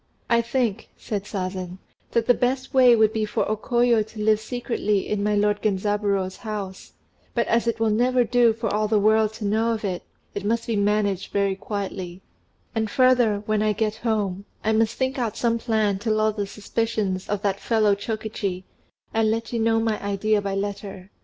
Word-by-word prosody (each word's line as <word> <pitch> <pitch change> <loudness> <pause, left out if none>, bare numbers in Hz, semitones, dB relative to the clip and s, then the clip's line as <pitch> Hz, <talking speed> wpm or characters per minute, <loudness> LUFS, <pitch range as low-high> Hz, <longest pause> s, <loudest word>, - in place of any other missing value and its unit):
"I 235 0 +5
think," 235 -3 -1
said 205 -2 -4
Sazen, 185 -2 -4 0.3
"that 230 -1 +1
the 245 - +5
best 255 +2 -1
way 255 -2 +7
would 220 -1 +3
be 220 -1 0
for 210 - -1
O 215 - 0
Koyo 240 +1 +2
to 215 +1 -8
live 215 0 +3
secretly 220 -3 -1
in 210 -1 -1
my 210 0 +1
lord 205 0 +1
Genzaburô's 200 -2 0
house; 205 -4 -6 0.4
but 235 - +2
as 235 +1 +1
it 230 - 0
will 225 -1 +2
never 245 +3 +3
do 240 0 +4
for 225 -1 -3
all 215 0 +1
the 215 0 +2
world 215 +1 +3
to 220 -1 -6
know 220 +3 +1
of 220 -1 -4
it, 185 -3 -2 0.3
it 200 - -4
must 230 +2 0
be 230 - -1
managed 205 -2 0
very 200 -1 +1
quietly; 190 -3 -5 0.5
and 220 -2 -1
further, 245 -4 +3
when 215 0 +1
I 215 0 +2
get 215 +1 -1
home, 205 -4 -1 0.2
I 220 - +2
must 225 +1 +2
think 260 +1 -1
out 230 -3 -2
some 230 -1 +1
plan 215 -4 0
to 225 - -3
lull 215 0 +2
the 205 -1 -3
suspicions 205 -2 -2
of 205 -1 -2
that 200 -1 0
fellow 215 -3 +2
Chokichi, 205 -3 -3 0.5
and 225 -1 +2
let 225 +2 -2
you 235 - 0
know 225 0 +2
my 225 -1 -1
idea 205 +1 +1
by 200 -1 -2
letter. 200 -1 -5
215 Hz, 195 wpm, -24 LUFS, 200-230 Hz, 0.5 s, way